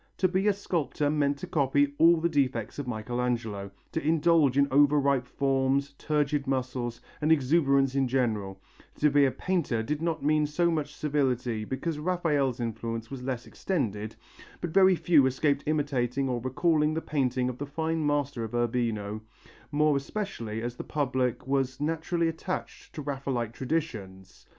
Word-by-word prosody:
To 185 - +3
be 190 +3 0
a 205 - +5
sculptor 165 -6 -1
meant 145 -2 +1
to 165 - -6
copy 145 -3 +2
all 165 +1 +7
the 170 - +2
defects 135 -7 -1
of 140 - -4
Michelangelo, 115 -3 -2 0.2
to 160 - -2
indulge 155 -3 +3
in 140 0 +5
over 145 +2 +5
ripe 140 -3 +1
forms, 135 +1 0
turgid 150 -1 0
muscles 125 -3 -2 0.2
and 155 +1 +2
exuberance 140 -2 +3
in 135 -1 +1
general; 110 -7 -1 0.4
to 150 -1 +2
be 145 0 +5
a 135 - +2
painter 150 -12 -1
did 150 +5 -2
not 165 -2 -1
mean 150 0 +3
so 170 +3 +1
much 150 -2 -2
servility 125 -7 -1
because 150 +6 -3
Raphael's 150 -7 0
influence 115 0 -4
was 135 -2 -6
less 125 -1 -4
extended, 110 - -3 0.4
but 175 - -4
very 190 +1 +6
few 155 -6 +4
escaped 140 +2 +1
imitating 140 -3 0
or 125 -2 -2
recalling 155 +4 +1
the 160 - -1
painting 130 -4 0
of 125 -1 -5
the 145 - -4
fine 160 +2 -2
master 145 -4 0
of 115 +1 -5
Urbino, 115 -3 -1 0.5
more 150 0 +3
especially 135 - -4
as 120 0 -4
the - - -5
public 130 -4 -1
was 135 -1 0
naturally 165 +2 0
attached 165 +3 -5
to 150 - -5
Raphaelite 135 -5 -3
traditions. 115 - -4
140 Hz, 160 wpm, -28 LUFS, 125-155 Hz, 0.5 s, all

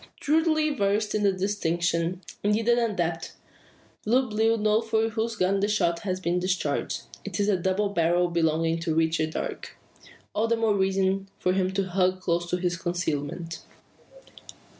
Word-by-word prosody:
Thoroughly 310 0 +2
versed 210 -2 0
in 215 - 0
the 200 -1 +4
distinction 175 -2 -1 0.2
indeed 210 +2 +1
an 240 0 +4
adept 175 -8 -1 0.7
Blue 250 +4 +2
Bill 225 +1 +3
knows 215 +1 +1
from 225 0 +1
whose 225 +1 -2
gun 195 0 +1
the 200 - +1
shot 170 -5 +1
has 185 0 -3
been 175 -1 0
discharged. 180 -5 -1 0.2
It 200 -2 -5
is 205 - +3
the 205 -1 +3
double 190 +3 0
barrel 175 -1 +2
belonging 165 0 +1
to 165 -1 -1
Richard 160 -1 +1
Darke. - - -5 0.6
All 220 +2 +1
the 230 0 +1
more 225 -2 +2
reason 195 0 +1
for 180 - +1
him 185 -1 +1
to 195 0 +1
hug 185 0 +1
close 175 -1 -1
to 180 - 0
his 180 0 -1
concealment. 170 -2 -3
190 Hz, 160 wpm, -26 LUFS, 170-210 Hz, 0.7 s, the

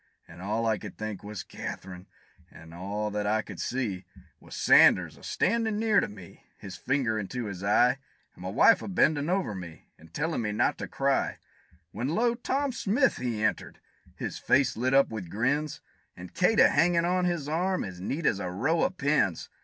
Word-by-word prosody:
And 85 +2 -13
all 110 +4 -1
I 110 -2 +1
could - - -9
think, 110 -3 -5
was 105 -1 -6
"Kath'rine!" 90 0 -8 0.4
and 80 0 -14
all 100 +4 -4
that 105 0 -2
I 110 +1 +1
could 95 -5 -10
see, 110 -8 -2 0.4
Was - - -11
Sanders - - +5
a - - -18
standin' 220 +1 0
near 220 -2 +3
to - - -1
me, 95 -4 -14
his 95 -2 -9
finger 115 +2 0
into 115 +4 -4
his 100 -2 -6
eye, 125 +6 +3 0.3
And - - -16
my 90 - -4
wife 170 - +5
a - - -6
bendin' 155 -5 +2
over 185 - 0
me, 90 -4 -10
and 80 0 -17
tellin' 160 - -2
me 105 -2 -2
not - - +1
to - - -4
cry; - - 0 0.5
When, 120 +5 -3
lo! 230 - +1
Tom 270 +3 -1
Smith 245 +3 +1
he 115 -4 -3
entered 105 - -2 0.4
his - - -5
face 135 -2 +2
lit 130 +3 +1
up 140 - +5
with 105 -6 -6
grins 135 - -1 0.4
And 90 0 -10
Kate 200 +5 +2
a - - +7
hangin' 170 -1 +3
on 180 +1 +1
his 170 -5 -1
arm, 180 +5 0
as 90 -2 -8
neat 145 - -3
as 100 - +2
a 90 - -3
row 135 - 0
of 185 - 0
pins! 140 - +1
120 Hz, 195 wpm, -28 LUFS, -, 0.5 s, a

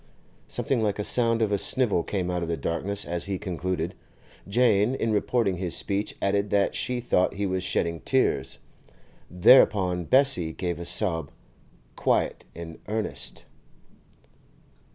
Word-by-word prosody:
Something 130 -4 -1
like 105 -2 0
the 105 - -3
sound 115 0 +2
of 105 - 0
a 100 - +1
snivel 120 -8 +1
came 90 0 -2
out 90 0 -2
of 85 - -3
the 85 - -1
darkness 100 +5 -3
as 85 0 -3
he 100 -1 -2
concluded. 90 -2 -3 0.5
Jane, 110 +1 +3
in 115 -3 -1
reporting 105 -2 +1
his 85 -2 -2
speech, 100 +1 -2
added 100 +1 +1
that 100 0 +2
she 125 -1 -2
thought 100 -6 +1
he 100 +1 -2
was 95 -1 -1
shedding 85 -2 -1
tears. 130 +8 0 0.7
Thereupon 90 -2 +4
Bessie 130 - +3
gave 85 -1 -3
a 85 - -6
sob, 85 -4 -1 0.7
quite - - 0
in 80 -1 -8
earnest. 110 +1 -3
100 Hz, 145 wpm, -26 LUFS, 90-110 Hz, 0.7 s, Thereupon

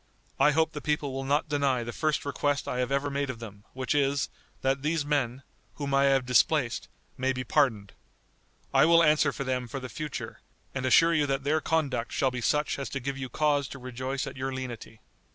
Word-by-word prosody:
I 135 +2 +6
hope 160 +2 +2
the 150 - -6
people 150 -2 -1
will 135 0 -3
not 145 +4 +1
deny 140 -4 +1
the 120 0 -6
first 155 -2 0
request 145 0 -1
I 125 - -2
have 125 +1 -1
ever 140 +1 0
made 140 0 -1
to 130 - -4
them, 105 -3 -11
which 130 +3 -1
is, 140 -1 +1 0.3
that 135 +1 +1
these 155 0 0
men, 135 -3 -1 0.3
whom 140 -2 -3
I 135 0 +4
have 135 -2 +3
displaced, 125 0 +2 0.3
may 130 +1 +2
be 130 0 -3
pardoned. 115 -7 +1 0.8
I - - +6
will 170 +1 +6
answer 150 -2 +4
for 140 - -4
them 125 -1 -2
for 135 - -5
the 130 -1 -7
future, 155 0 -6 0.3
and 130 -1 -2
assure 165 +6 +6
you 150 -3 +2
that 135 0 -1
their 155 +2 +1
conduct 145 -8 -1
shall 130 - +1
be 125 -1 -4
such 150 +3 +1
as 135 -5 -4
to 140 - -3
give 135 +2 -3
you 130 -1 -4
cause 145 +1 +1
to 140 - -8
rejoice 130 +2 -4
at 135 -1 -8
your 135 +1 -2
lenity." 125 -4 -7
135 Hz, 215 wpm, -28 LUFS, 130-145 Hz, 0.8 s, I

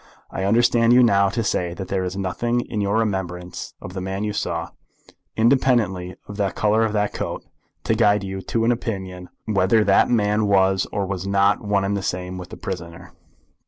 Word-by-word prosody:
I 95 - -3
understand 115 +2 +4
you 125 0 +6
now 100 -4 +4
to 115 +3 -2
say 90 -3 -1
that 95 -1 -7
there 95 -1 -1
is 90 +1 -4
nothing 120 +6 -1
in 110 -3 -4
your 100 +2 +1
remembrance 90 -5 -3
of 90 - -9
the 95 - -4
man 95 +2 -3
you 105 -1 -2
saw, - - -3 0.7
independently 110 -7 +2
of 105 - -8
the 100 -2 +1
colour 105 +4 +1
of 110 -1 0
the 105 -1 +1
coat, - - -5 0.4
to - - +1
guide 105 -1 +3
you 95 0 -5
to 115 +3 -1
an 120 - +4
opinion 95 -6 -4 0.2
whether 105 +1 +3
that 100 -1 +4
man 105 -2 +2
was 95 -1 +3
or 100 -2 -1
was 95 0 -4
not 100 +1 +2
one 100 -1 +1
and 100 +1 0
the 100 - -2
same 90 0 -4
with 90 -1 -9
the - - -9
prisoner?" 85 -3 -7
100 Hz, 200 wpm, -22 LUFS, 95-110 Hz, 0.7 s, you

